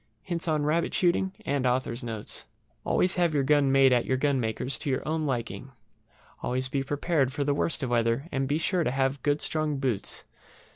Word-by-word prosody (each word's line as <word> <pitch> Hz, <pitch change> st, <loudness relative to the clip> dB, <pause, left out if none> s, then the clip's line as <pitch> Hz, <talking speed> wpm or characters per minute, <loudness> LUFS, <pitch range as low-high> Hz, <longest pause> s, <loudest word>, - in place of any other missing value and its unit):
HINTS 175 Hz, -1 st, -4 dB
ON 155 Hz, -2 st, +1 dB
RABBIT 160 Hz, +3 st, +1 dB
SHOOTING. 185 Hz, +1 st, +2 dB, 1.5 s
Always 180 Hz, -, +2 dB
have 170 Hz, -3 st, +2 dB
your 140 Hz, -, +3 dB
gun 140 Hz, 0 st, +3 dB
made 135 Hz, -1 st, +6 dB
at 120 Hz, -, +3 dB
your 130 Hz, -, 0 dB
gunmaker's 130 Hz, -2 st, -1 dB
to -, -, -3 dB
your 130 Hz, -, -1 dB
own 155 Hz, -1 st, 0 dB
liking. 120 Hz, -1 st, -4 dB, 0.7 s
Always 130 Hz, +1 st, -1 dB
be 135 Hz, 0 st, 0 dB
prepared 145 Hz, 0 st, 0 dB
for 145 Hz, +1 st, -2 dB
the 145 Hz, 0 st, +1 dB
worst 155 Hz, +1 st, -1 dB
of 125 Hz, -, -2 dB
weather, 115 Hz, +4 st, +1 dB
and 135 Hz, -1 st, -1 dB
be 145 Hz, +2 st, +1 dB
sure 175 Hz, +2 st, +1 dB
to -, -, +1 dB
have 135 Hz, +1 st, 0 dB
good 145 Hz, 0 st, +1 dB
strong 155 Hz, -2 st, 0 dB
boots. 125 Hz, -7 st, -2 dB
140 Hz, 180 wpm, -27 LUFS, 130-155 Hz, 1.5 s, made